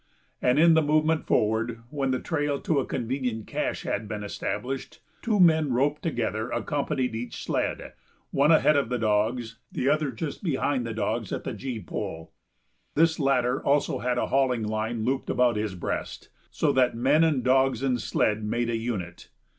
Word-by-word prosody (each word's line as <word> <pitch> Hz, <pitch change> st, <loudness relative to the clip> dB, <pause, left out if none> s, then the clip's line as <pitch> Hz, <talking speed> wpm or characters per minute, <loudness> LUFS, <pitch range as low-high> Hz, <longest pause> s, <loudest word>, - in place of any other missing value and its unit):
And 125 Hz, +2 st, +3 dB
in 165 Hz, +2 st, +6 dB
the 160 Hz, -, +5 dB
movement 155 Hz, +1 st, +1 dB
forward, 110 Hz, +2 st, +1 dB
when 140 Hz, -3 st, -1 dB
the 130 Hz, -1 st, 0 dB
trail 145 Hz, -3 st, -1 dB
to 155 Hz, -4 st, +1 dB
a 135 Hz, -, -2 dB
convenient 120 Hz, -3 st, -2 dB
cache -, -, -3 dB
had 105 Hz, +1 st, -2 dB
been 105 Hz, -1 st, -5 dB
established, 135 Hz, +8 st, -4 dB, 0.2 s
two 215 Hz, -3 st, +1 dB
men, 160 Hz, -5 st, +5 dB
roped 145 Hz, +4 st, +1 dB
together, 115 Hz, -, -2 dB
accompanied 135 Hz, -4 st, -1 dB
each 120 Hz, +2 st, -5 dB
sled, -, -, -2 dB, 0.4 s
one 145 Hz, +3 st, +4 dB
ahead 155 Hz, -1 st, +5 dB
of 140 Hz, -5 st, +1 dB
the 125 Hz, -, 0 dB
dogs, 115 Hz, +2 st, 0 dB
the 135 Hz, -, 0 dB
other 155 Hz, -1 st, +2 dB
just 145 Hz, +5 st, -5 dB
behind 135 Hz, -6 st, 0 dB
the 115 Hz, -, -4 dB
dogs 110 Hz, -1 st, -2 dB
at -, -, -3 dB
the -, -, -4 dB
gee 130 Hz, -4 st, -5 dB
pole. 80 Hz, -3 st, -6 dB, 0.6 s
This 165 Hz, +1 st, +3 dB
latter 130 Hz, -3 st, +2 dB
had -, -, -16 dB
also 145 Hz, +1 st, +2 dB
a 125 Hz, 0 st, 0 dB
hauling 130 Hz, -4 st, +1 dB
line 110 Hz, +1 st, -2 dB
looped 130 Hz, +2 st, -1 dB
about 125 Hz, -2 st, +3 dB
his 105 Hz, -2 st, -2 dB
breast, 90 Hz, -, -4 dB, 0.2 s
so -, -, +1 dB
that 125 Hz, -2 st, +2 dB
men 140 Hz, +7 st, +3 dB
and 150 Hz, -6 st, +2 dB
dogs 130 Hz, -1 st, +2 dB
and 125 Hz, -3 st, +1 dB
sled 105 Hz, -1 st, 0 dB
made 120 Hz, +2 st, -1 dB
a 115 Hz, -, 0 dB
unit. 100 Hz, -7 st, -5 dB
125 Hz, 180 wpm, -26 LUFS, 115-145 Hz, 0.6 s, in